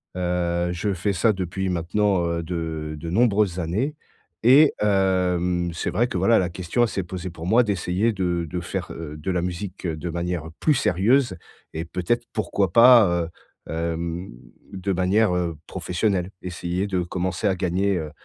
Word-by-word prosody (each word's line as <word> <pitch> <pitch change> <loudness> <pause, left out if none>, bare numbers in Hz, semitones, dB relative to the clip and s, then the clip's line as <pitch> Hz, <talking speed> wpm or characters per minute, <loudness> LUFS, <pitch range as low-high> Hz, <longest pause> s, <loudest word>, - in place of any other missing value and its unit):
Heu, 90 -1 0
je 100 +3 -1
fais 95 +3 -1
ça 105 +5 +3
depuis 95 0 -3
maintenant, 90 +2 +1
heu, 85 0 -1
de 80 -2 -4
de 85 +2 -6
nombreuses 100 -2 +2
années. 105 - -1 0.5
Et 140 +6 +7
hem, 90 -3 +1
c'est 80 - -3
vrai 120 +2 +2
que 95 - -3
voilà, 100 +6 +4
la 90 - 0
question, 90 +6 -2
elle 120 - +5
s'est 100 -3 -3
posée 90 +1 -6
pour 85 -1 -9
moi 115 +7 +4
d'essayer 100 +1 0
de 90 -4 -1
de 90 - -3
faire, 90 +2 -4
heu, 80 -2 -7
de 75 +5 -3
la 90 -1 0
musique 90 +2 -5
heu, 80 -2 -1
de 85 +3 -5
manière 85 0 -2 0.2
plus 155 - +3
sérieuse 115 - +2 0.4
et 80 +1 -4
peut-être 90 +8 -1
pourquoi 100 -4 0
pas, 120 -1 +8
heu, 85 -1 0 0.4
hem, 85 +2 -3 0.4
de 95 +1 -2
manière, 95 +3 +2
heu, 85 -2 -1
professionnelle. 90 0 -1
Essayer 90 +1 -3
de 95 -2 0
commencer 90 +3 -2
à 95 - +2
gagner, 95 +2 0
heu 80 -3 -4
90 Hz, 175 wpm, -24 LUFS, 85-100 Hz, 0.5 s, pas